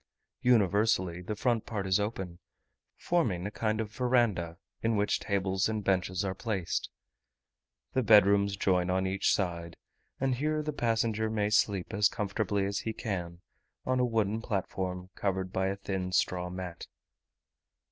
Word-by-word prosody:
Universally 100 -6 +3
the 105 +4 -4
front 115 0 0
part 100 -4 -3
is 95 +2 +3
open, 95 -5 -4 0.6
forming 110 - 0
a 100 - -3
kind 110 0 -1
of 110 -2 -3
verandah, 115 -10 +1 0.2
in 115 0 +1
which 105 0 +1
tables 95 0 0
and 110 -1 -2
benches 95 0 0
are 95 - -1
placed. 95 -5 -2 1.0
The 130 - +2
bed 105 -4 +7
rooms 100 0 +2
join 90 -2 +2
on 95 +1 +1
each 95 +1 +1
side, 85 -3 -2 0.4
and 135 0 +1
here 155 +4 0
the 150 0 -3
passenger 115 -3 0
may 105 -1 0
sleep 100 -3 +1
as 100 0 +4
comfortably 100 -1 -1
as 100 0 -1
he 110 - -3
can, 90 -6 -4 0.4
on 130 0 +1
a - - +3
wooden 110 -2 0
platform, 95 -3 -3
covered 95 -2 -2
by 95 0 +1
a 100 - -1
thin 95 -2 -3
straw 90 -1 +1
mat. 90 -2 -6
100 Hz, 155 wpm, -30 LUFS, 95-110 Hz, 1.0 s, bed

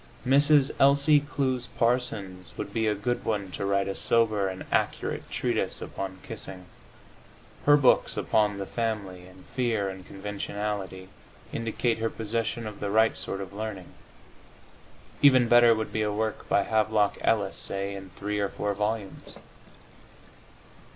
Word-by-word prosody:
Mrs. 140 +1 +5
Elsie 140 +2 +5
Clews 130 -3 -2
Parsons 110 -6 -1
would 100 - -5
be 110 -1 +1
a 105 - +2
good 120 +5 -2
one 100 -4 -2
to 100 - -3
write 100 0 +1
a 100 - -2
sober 110 -2 +2
and 95 -1 -6
accurate - - -1
treatise - - -1
upon 95 -1 -6
kissing. 90 -1 -5 1.0
Her 145 0 +8
books 135 -4 +3
upon 105 -2 +1
"The 100 - -4
Family" 100 -6 -3
and 95 0 -16
"Fear 115 -6 -1
and 95 -1 -8
Conventionality" 100 -1 -5 0.4
indicate 115 +1 -1
her 115 0 0
possession 115 +1 -3
of 105 -1 -7
the 100 - -2
right 110 +2 +3
sort 95 - -2
of 95 0 -8
learning. 100 -3 -6 1.3
Even 130 -4 +6
better 120 0 +6
would 110 0 -4
be 110 - 0
a 105 -1 0
work 110 +1 -3
by 100 - +3
Havelock 110 -1 +1
Ellis, 100 -4 +1
say, 100 0 -4
in 95 -1 -8
three 105 +1 -3
or 100 -1 0
four 105 +1 -2
volumes. 105 0 -3
105 Hz, 145 wpm, -27 LUFS, 100-115 Hz, 1.3 s, Her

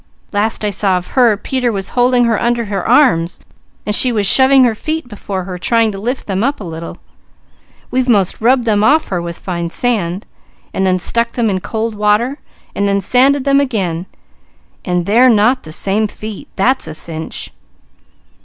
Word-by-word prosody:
Last 215 +1 -1
I 205 - 0
saw 195 -1 +1
of 180 - -7
her, 240 -5 +3
Peter 250 +2 -1
was 195 -2 -4
holding 245 0 +2
her 225 -2 +1
under 235 0 0
her 200 -3 -3
arms, 175 - +3 0.5
and 210 - -1
she 255 - +3
was 210 -3 0
shoving 265 +5 +5
her 240 -3 +3
feet 315 +6 -4
before 200 -4 -5
her 180 -1 -7
trying 230 +3 +2
to 195 - -7
lift 245 +6 -3
them 195 +1 -1
up 275 +3 0
a - - -7
little. 165 -1 -7 0.9
We've 255 0 0
most 200 -4 +2
rubbed 250 +2 +3
them 210 -3 +1
off 300 +7 +3
her 180 -3 -2
with 170 0 -6
fine 170 -2 -4
sand, 195 -4 -2 0.5
and 190 0 0
then 185 0 +2
stuck 235 +6 -1
them 230 -4 0
in 190 - -1
cold 220 +3 -3
water, 210 +6 +1 0.3
and 200 - 0
then 200 0 +1
sanded 260 +7 +2
them 275 0 +3
again, 190 -10 -2 0.8
and 180 -2 -1
they're 235 +6 +5
not 240 +3 +3
the 155 - -11
same 200 +6 0
feet 215 0 -9
that's 255 +7 +1
a 155 - -6
cinch!" 160 +1 -6
215 Hz, 185 wpm, -15 LUFS, 190-245 Hz, 0.9 s, shoving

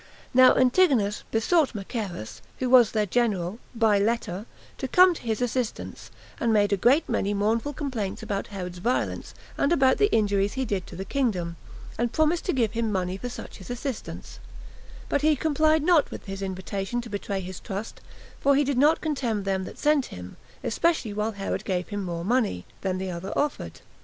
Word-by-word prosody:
Now 255 0 +7
Antigonus 255 - +3
besought 265 +5 +2
Machaerus, 195 - -5 0.2
who 255 -1 -1
was 245 -4 +7
their 215 -1 +1
general, 205 -3 0 0.2
by 220 -3 +3
letter, 215 -1 -1 0.3
to 265 - -2
come 365 +6 +6
to - - -9
his 225 +1 -1
assistance, 245 -1 -3 0.3
and 235 -6 +1
made 205 -1 +3
a - - +5
great 250 - +3
many 205 +1 0
mournful 225 +7 0
complaints 255 -9 -4
about 200 -1 -3
Herod's 180 -3 -6
violence, 240 +7 -2 0.2
and 280 - +2
about 270 -5 +4
the 415 0 +3
injuries 205 -2 +2
he 265 0 -1
did 195 -5 -2
to - - -10
the 190 +2 -5
kingdom; 190 -11 -1 0.4
and 240 -1 +1
promised 315 +3 +1
to - - +1
give 235 - +1
him 230 -1 -1
money 185 -2 -1
for 245 +6 -5
such - - -9
his 190 - -12
assistance; 245 -1 -6 0.7
but - - 0
he 305 0 +4
complied 310 +1 +2
not 330 -3 +4
with - - -8
his 195 0 -6
invitation 195 +4 -3
to 235 - -9
betray 200 -1 -3
his 185 -1 -7
trust, 205 +1 -6 0.4
for 280 0 +4
he 290 - +4
did 275 -2 0
not 300 +4 +4
contemn 245 -10 -1
him 190 -1 -1
that - - -9
sent 295 -3 +2
him, 90 0 -9 0.3
especially 285 -4 0
while 210 +2 -1
Herod 195 -1 -3
gave 180 -2 -2
him 205 -1 -3
more 170 -2 -4
money 220 - 0 0.2
[than 185 -1 -1
the 190 0 -3
other 175 +2 -5
offered]. 295 0 -2
225 Hz, 185 wpm, -26 LUFS, 195-265 Hz, 0.7 s, Now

